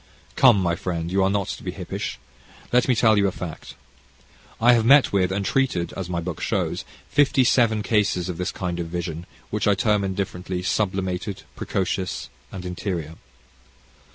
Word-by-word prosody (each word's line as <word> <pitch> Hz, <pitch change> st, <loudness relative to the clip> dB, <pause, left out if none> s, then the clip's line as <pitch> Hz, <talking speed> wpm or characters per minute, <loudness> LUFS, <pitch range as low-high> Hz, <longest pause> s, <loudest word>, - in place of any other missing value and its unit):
Come, 120 Hz, -6 st, +6 dB
my 85 Hz, -2 st, +1 dB
friend, 85 Hz, -1 st, -3 dB
you 95 Hz, +1 st, +2 dB
are 95 Hz, -, +3 dB
not 100 Hz, -1 st, 0 dB
to -, -, -5 dB
be -, -, -5 dB
hippish. -, -, -5 dB, 0.6 s
Let 125 Hz, -, +4 dB
me 130 Hz, -, +3 dB
tell 110 Hz, -1 st, +4 dB
you 100 Hz, -, +3 dB
a -, -, 0 dB
fact. 85 Hz, -3 st, -8 dB, 0.8 s
I 120 Hz, +2 st, +6 dB
have 115 Hz, -2 st, +3 dB
met 135 Hz, +1 st, +6 dB
with, 95 Hz, -2 st, +2 dB
and 100 Hz, +1 st, -1 dB
treated, 130 Hz, -11 st, 0 dB
as 95 Hz, -2 st, -5 dB
my 85 Hz, -1 st, -1 dB
book 85 Hz, -1 st, -5 dB
shows, -, -, -1 dB, 0.2 s
fifty 140 Hz, -2 st, +3 dB
seven 115 Hz, -4 st, +3 dB
cases 100 Hz, -5 st, +1 dB
of 90 Hz, -2 st, -5 dB
this 90 Hz, +3 st, -1 dB
kind 90 Hz, -2 st, -4 dB
of 85 Hz, -, -3 dB
vision, 85 Hz, 0 st, -5 dB, 0.2 s
which 105 Hz, -1 st, 0 dB
I 100 Hz, -, +5 dB
term 105 Hz, 0 st, +2 dB
indifferently 95 Hz, -1 st, -3 dB
"sublimated," 95 Hz, 0 st, -1 dB
"precocious," 95 Hz, -1 st, -2 dB, 0.2 s
and 90 Hz, -1 st, -7 dB
"interior." 90 Hz, -3 st, -4 dB
95 Hz, 175 wpm, -23 LUFS, 90-105 Hz, 0.8 s, Come